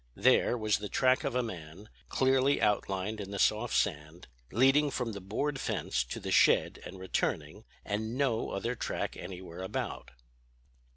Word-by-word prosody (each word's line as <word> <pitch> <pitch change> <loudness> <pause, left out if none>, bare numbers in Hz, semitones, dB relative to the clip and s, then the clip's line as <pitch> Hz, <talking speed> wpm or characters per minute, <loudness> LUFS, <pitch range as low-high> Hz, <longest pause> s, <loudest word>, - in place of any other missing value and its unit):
There, 125 - +4
was 110 -2 +1
the 105 -1 -5
track 130 +4 +3
of - - -2
a 125 - +2
man, 90 -2 -8 0.2
clearly 135 +1 +3
outlined 105 0 0
in 100 - -7
the 100 - -4
soft 110 +4 +2
sand, 80 -2 -1 0.2
leading 135 +6 +4
from 125 -3 -2
the 100 -2 -7
board 135 +9 -2
fence 60 - -1
to - - -6
the - - -5
shed - - +4
and 95 - -9
returning, 95 -1 -2 0.2
and 110 +4 -2
no 130 -5 +1
other 115 +5 -2
track 125 - -3
anywhere 90 -1 -8
about. 95 - -4
105 Hz, 160 wpm, -31 LUFS, 95-125 Hz, 0.2 s, There